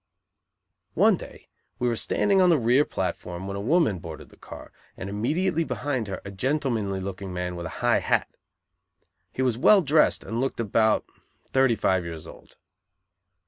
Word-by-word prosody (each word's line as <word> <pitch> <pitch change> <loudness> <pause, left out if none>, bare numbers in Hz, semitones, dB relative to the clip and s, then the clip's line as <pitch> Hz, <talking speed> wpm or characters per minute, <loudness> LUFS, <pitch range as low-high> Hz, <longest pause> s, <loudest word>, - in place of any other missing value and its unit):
One - - +5
day - - -12 0.3
we 125 - 0
were 120 - +1
standing 195 - +2
on 180 - +5
the 165 - +5
rear 125 +3 +3
platform 90 -1 -4
when 100 0 -5
a 100 - -4
woman 135 - +2
boarded 80 -2 -9
the - - -18
car, - - -11 0.3
and 95 - -6
immediately 165 - 0
behind 130 -7 -3
her 95 -2 -5
a 100 - -6
gentlemanly 115 -3 -1
looking 95 0 -6
man 90 0 -4
with 85 -1 -5
a - - -9
high - - +4
hat. - - +1 1.0
He 130 - -2
was 125 -3 0
well 200 +6 +6
dressed 155 +1 +3
and 115 +2 -3
looked 135 - -2
about 110 0 +2 0.5
thirty 130 -3 +4
five 95 -3 +1
years 80 -1 -7
old. - - -14
115 Hz, 170 wpm, -25 LUFS, 95-140 Hz, 1.0 s, well